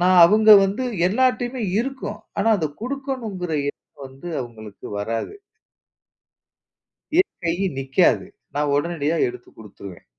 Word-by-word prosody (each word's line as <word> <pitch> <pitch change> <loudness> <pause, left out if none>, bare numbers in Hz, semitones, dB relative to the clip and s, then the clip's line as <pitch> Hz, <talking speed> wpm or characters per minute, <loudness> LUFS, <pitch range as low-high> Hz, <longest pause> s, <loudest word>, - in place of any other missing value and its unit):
நான் 185 +1 +4
அவங்க 215 +5 +6
வந்து 200 +7 -1 0.2
எல்லார்ட்டயுமே 250 +2 0 0.2
இருக்கும். 260 -5 -5 0.2
ஆனா, 205 +3 +2
அத 155 -2 -1
குடுக்கணும்ங்கற 245 - -4 0.2
எண்ணம் 140 - -16
வந்து 135 +6 -11
அவங்களுக்கு 110 -4 -10
வராது. 115 - -3 1.8
என் 380 - 0
கை 165 0 +1 0.2
நிக்காது. 135 -1 +2 0.3
நான் 145 0 0
உடனடியா 160 +1 0
எடுத்துக் 125 0 -11
குடுத்துடுவேன். 100 -4 -12
175 Hz, 110 wpm, -22 LUFS, -, 1.8 s, அவங்க